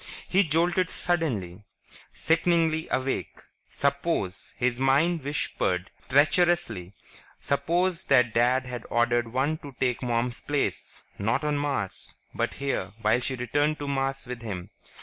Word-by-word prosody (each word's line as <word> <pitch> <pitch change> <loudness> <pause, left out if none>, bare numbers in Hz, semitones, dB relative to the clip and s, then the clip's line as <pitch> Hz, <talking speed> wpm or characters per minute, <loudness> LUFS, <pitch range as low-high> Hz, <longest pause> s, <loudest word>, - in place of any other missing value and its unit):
He 195 +2 +4
jolted 170 +2 +1
suddenly, 115 - -1 0.5
sickeningly 165 -1 +1
awake. 130 +1 -2 0.3
Suppose, 140 - -1
his 125 -1 0
mind 145 +5 +3
whispered 100 -10 -1 0.2
treacherously, 145 - +2 0.4
suppose 175 +5 +1
that 125 -4 +4
Dad 125 +3 +3
had 125 -1 -6
ordered 120 0 +1
one 140 +5 0
to 140 -3 -11
take 125 -2 0
Mom's 120 -1 -1
place... 140 - -2 0.2
not 110 +9 0
on 150 -1 +1
Mars, 140 -10 -3 0.2
but - - -1
here 135 -8 -2
while 110 +3 +4
she 130 +1 -2
returned 145 +5 0
to 145 - -5
Mars 135 -1 -1
with 125 -1 -6
him. 95 -6 -6
135 Hz, 130 wpm, -27 LUFS, 120-155 Hz, 0.5 s, He